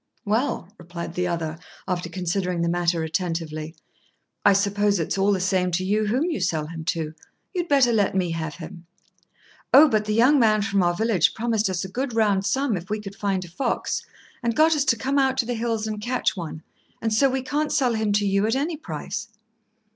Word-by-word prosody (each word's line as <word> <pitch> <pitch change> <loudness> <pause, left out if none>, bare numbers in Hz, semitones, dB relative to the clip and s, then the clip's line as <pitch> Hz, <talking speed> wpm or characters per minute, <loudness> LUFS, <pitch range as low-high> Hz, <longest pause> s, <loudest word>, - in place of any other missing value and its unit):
"Well," 215 -2 -1
replied 170 0 -7
the 180 0 -1
other, 165 -2 -3 0.3
after 175 -1 -2
considering 180 -1 -2
the - - +1
matter 170 -1 +1
attentively, 160 -2 -3 0.7
"I 205 - +6
suppose 200 0 +2
it's 165 - -1
all 195 +1 +2
the 195 - +1
same 185 -1 +1
to 185 +2 0
you 210 +2 +1
whom 250 +7 +1
you 335 -2 -1
sell 155 -2 0
him 165 +1 -7
to. 160 -1 -2 0.4
You'd 350 -2 -2
better 270 -5 +4
let 205 -3 +2
me 180 -3 +1
have 160 -2 -4
him." 170 0 -10 0.8
"Oh, 300 +3 +9
but 215 -5 +1
the 210 0 -1
young 260 +6 +5
man 215 -3 +3
from 200 -2 +1
our 175 -1 +2
village 215 -5 +2
promised 220 -3 0
us 185 0 -2
a - - -4
good 245 +5 -3
round 200 -3 +2
sum 265 +1 +1
if 180 +2 -7
we 215 +1 -1
could 200 -1 -8
find 195 -3 -1
a - - -11
fox, 235 +9 -2 0.4
and 235 -2 -1
got 315 +1 +5
us 290 -2 +1
to 245 -4 +3
come 275 +4 0
out 265 -1 +2
to 245 - +1
the 245 - -2
hills 225 -1 -1
and 215 -1 -4
catch 245 0 0
one; 165 -3 -6 0.4
and 225 -1 -1
so 270 +5 +4
we 260 0 -2
can't 295 +3 -1
sell 255 -5 +2
him 220 -2 0
to 205 0 +2
you 200 +1 +2
at 225 - +1
any 305 +4 -1
price." 210 - -5
205 Hz, 215 wpm, -24 LUFS, 175-235 Hz, 0.8 s, Oh